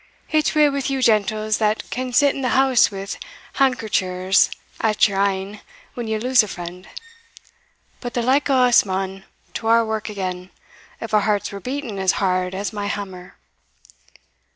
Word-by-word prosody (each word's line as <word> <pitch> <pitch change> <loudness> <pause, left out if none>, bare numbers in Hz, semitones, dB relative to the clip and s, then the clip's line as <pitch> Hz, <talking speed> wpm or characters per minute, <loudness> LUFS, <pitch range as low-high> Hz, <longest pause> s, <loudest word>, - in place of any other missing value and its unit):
It's 310 0 +1
weel 300 -1 +5
wi' 280 0 -2
you 270 -2 -1
gentles, 215 -1 +1
that 215 0 0
can 255 0 -3
sit 280 +3 +4
in 275 - -5
the 255 0 +1
house 265 -2 +4
wi' 195 -1 -6 0.5
handkerchers 195 -8 +2 0.3
at 215 -1 +3
your 195 -1 -3
een 200 +1 -2 0.3
when 240 -2 -5
ye 220 0 -1
lose 250 +3 +4
a 215 - -4
friend; 180 0 -8 1.1
but 245 -2 -6
the 240 - 0
like 275 +4 +2
o' 260 -2 +4
us 245 -1 +5
maun 190 0 -4 0.3
to 225 - -4
our 230 0 +4
wark 220 0 -3
again, 185 -3 -5 0.5
if 225 -1 -7
our 210 - +5
hearts 205 -1 0
were 200 - -7
beating 250 -2 -5
as 190 -1 +2
hard 185 -1 0
as 200 +3 -4
my 205 -1 -3
hammer." 190 -3 -6
215 Hz, 170 wpm, -21 LUFS, 195-250 Hz, 1.1 s, weel